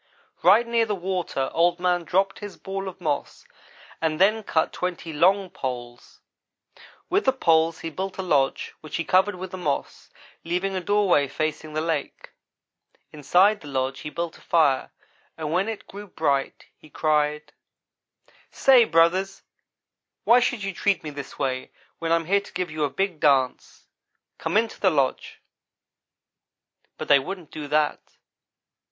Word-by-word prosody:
"Right 205 +7 +6
near 235 -1 +1
the 210 - -1
water 180 -7 -2
Old 175 +1 +2
man 180 -1 +1
dropped 195 +3 0
his 205 -2 -8
ball 195 0 -5
of 190 -1 -8
moss 150 -5 -3 0.6
and 160 -1 -1
then 215 +4 +4
cut 160 -6 0
twenty 175 -2 -4
long 185 +4 +3
poles. 120 -7 -7 0.9
With 390 +3 +1
the 265 - +5
poles 165 -9 +2
he 165 - -5
built 190 +4 -5
a 190 - -3
lodge 140 -6 0
which 155 - -7
he 170 - -1
covered 190 +4 +2
with 185 0 -7
the 185 - -6
moss, 145 -5 -3 0.3
leaving 180 +3 -2
a 185 - -2
doorway 190 -7 +2
facing 155 +2 -3
the 155 - -1
lake. 160 -2 -3 0.8
Inside 180 +8 +3
the 145 - -11
lodge 135 -1 -2
he 150 - -6
built 170 +2 -5
a - - -21
fire 150 -6 +2 0.5
and 155 -2 -4
when 190 +5 +1
it 220 - -6
grew 205 +1 -10
bright 140 -6 -1
he 155 - -19
cried: 150 -1 0 1.0
"'Say, 255 -3 +5
brothers, 180 +3 +2 0.8
why 240 +2 +6
should 245 -3 -1
you 195 -1 -3
treat 195 0 0
me 150 - -5
this 140 -2 -9
way 130 -1 -2 0.3
when 165 -1 -2
I - - +6
am 165 -1 -1
here 200 +4 +2
to 200 - -15
give 180 -3 -3
you 155 -1 -2
a - - -2
big 180 +2 -2
dance? 135 -4 +1 0.5
Come - - 0
into 225 0 0
the 190 - +4
lodge,' 140 -6 -1 1.6
but - - -6
they 140 -1 +6
wouldn't 180 +3 -7
do 150 -1 -6
that. 150 +1 +1
170 Hz, 160 wpm, -24 LUFS, 150-195 Hz, 1.6 s, Right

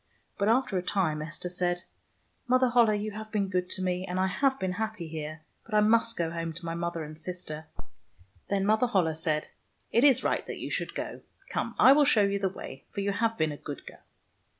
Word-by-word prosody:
But 200 - +2
after 225 -5 +2
a - - -2
time 175 -5 0
Esther 170 +3 -4
said, 175 0 -1 0.3
" - - -42
Mother 255 0 +4
Holle, 230 -3 +5
you 210 +1 -3
have 215 +1 -8
been 200 -2 0
good 180 -1 -1
to 190 - -1
me, 180 0 0
and 185 -1 -3
I 190 - +3
have 265 +8 +1
been 190 -1 -1
happy 220 -2 -3
here, 155 0 -6 0.2
but 220 - -5
I - - +6
must 230 +2 +3
go 165 -1 0
home 165 -1 -3
to 170 +2 -8
my 165 - -2
mother 170 -1 -3
and 155 +1 -9
sister." 160 -3 -5 0.8
Then 195 -1 +1
Mother 220 +4 +3
Holle 185 -8 +2
said, 155 -1 -1 0.2
" - - -43
It 235 - +4
is 265 -3 +6
right - - +1
that - - -5
you - - -5
should - - -2
go. - - -5 0.3
Come, - - -2
I 265 - +8
will 290 +1 +6
show 220 -7 +5
you 200 0 +1
the 195 -1 +1
way, 135 -7 -9
for 200 - -4
you 200 0 0
have 225 +2 0
been 155 -1 +1
a 145 - -6
good 145 -1 -8
girl." - - -11
190 Hz, 235 wpm, -29 LUFS, 165-220 Hz, 0.8 s, I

